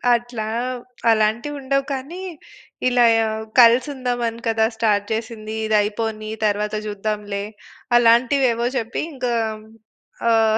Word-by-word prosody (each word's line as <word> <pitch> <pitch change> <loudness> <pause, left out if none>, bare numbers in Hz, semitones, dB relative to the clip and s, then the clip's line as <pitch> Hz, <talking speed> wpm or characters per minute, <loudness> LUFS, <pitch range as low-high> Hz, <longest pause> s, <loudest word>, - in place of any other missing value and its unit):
అట్లా. 235 -2 -4 0.6
అలాంటివి 225 +6 +1
ఉండవు 275 0 0
కానీ, 285 +8 -6 0.7
ఇలా 245 -1 +4
యా 225 0 +2 0.3
"కలిసి 240 +4 +6
ఉందాం 250 -2 -2
అని 230 +1 -6
కదా! 225 -1 +2
స్టార్ట్ 210 -3 +2
చేసింది. 220 -1 -5
ఇది 215 0 +1
అయిపోని 215 +1 -3 0.2
తరువాత 210 0 0
జూద్దాంలే." 205 -1 -3 0.5
అలాంటివి 240 +3 +4
ఏవో 235 +1 -1
చెప్పి 235 -1 -3
ఇంకా 250 -3 -2 1.0
ఆహ్, 220 -1 +4
225 Hz, 120 wpm, -21 LUFS, 215-245 Hz, 1.0 s, కలిసి